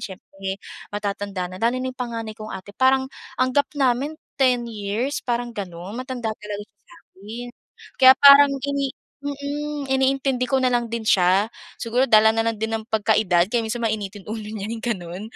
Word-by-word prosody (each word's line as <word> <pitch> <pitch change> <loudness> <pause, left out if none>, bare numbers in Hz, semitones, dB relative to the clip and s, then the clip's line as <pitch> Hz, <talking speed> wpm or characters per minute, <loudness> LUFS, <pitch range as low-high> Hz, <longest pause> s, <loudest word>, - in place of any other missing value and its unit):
siyempre 195 0 -6 0.3
matatanda 200 -2 -3
na 185 - -9
lalo 235 +2 +2
na 260 - -2
yung 255 - -16
panganay 230 -3 -4
kong 215 0 -7
ate 190 +1 -9
parang 265 +2 +2 0.3
ang 255 0 +2
gap 285 +2 +3
namin 270 +2 +1 0.3
10 250 -2 +4
years 220 +6 -2
parang 240 0 -2
ganon 185 -3 -7
matanda 255 -3 -3
talaga 210 -1 -7
siya 205 -1 -46
sa'kin. 235 - -10 0.5
Kaya 260 0 +10
parang 280 0 +9
ini 280 -1 -1 0.4
mm, 285 +1 -4
iniintindi 265 -1 +1
ko 265 0 +2
na 255 - +3
lang 240 -1 +1
din 230 0 -3
siya 195 +1 +3 0.3
siguro 245 +3 +1
dala 220 -1 +7
na 225 0 +1
lang 230 - 0
din 220 0 -2
ng 220 - -11
pagkaedad 210 -5 +2
kaya 235 -2 +2
minsan 235 +2 -3
mainitin 205 -2 -3
ulo 215 -1 -5
niya 215 -1 -5
yung 230 -1 -5
ganon. 185 -5 -4
230 Hz, 175 wpm, -23 LUFS, 205-260 Hz, 0.5 s, Kaya